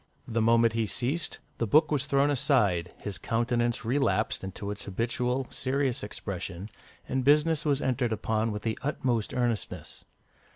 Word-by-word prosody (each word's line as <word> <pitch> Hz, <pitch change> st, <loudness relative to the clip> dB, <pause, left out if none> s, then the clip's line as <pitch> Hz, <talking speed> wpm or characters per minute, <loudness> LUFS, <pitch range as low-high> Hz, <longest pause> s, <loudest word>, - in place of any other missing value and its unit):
The 115 Hz, -1 st, 0 dB
moment 115 Hz, 0 st, +4 dB
he 115 Hz, -1 st, 0 dB
ceased, 135 Hz, +11 st, -1 dB, 0.2 s
the 115 Hz, -, 0 dB
book 155 Hz, +6 st, +4 dB
was 140 Hz, -2 st, +1 dB
thrown 140 Hz, +1 st, +3 dB
aside, 105 Hz, -, +2 dB
his 100 Hz, -2 st, -6 dB
countenance 120 Hz, 0 st, 0 dB
relapsed 115 Hz, -6 st, +1 dB
into 100 Hz, +1 st, -5 dB
its 105 Hz, -, -5 dB
habitual 125 Hz, +5 st, -1 dB
serious 135 Hz, -1 st, 0 dB
expression, 95 Hz, -2 st, -5 dB, 0.4 s
and 130 Hz, 0 st, -1 dB
business 150 Hz, +3 st, +3 dB
was 145 Hz, -2 st, +1 dB
entered 125 Hz, -2 st, 0 dB
upon 110 Hz, +1 st, 0 dB
with 105 Hz, 0 st, -5 dB
the 110 Hz, -1 st, -2 dB
utmost 125 Hz, -6 st, -1 dB
earnestness. 120 Hz, -3 st, -2 dB
120 Hz, 150 wpm, -28 LUFS, 110-135 Hz, 0.4 s, moment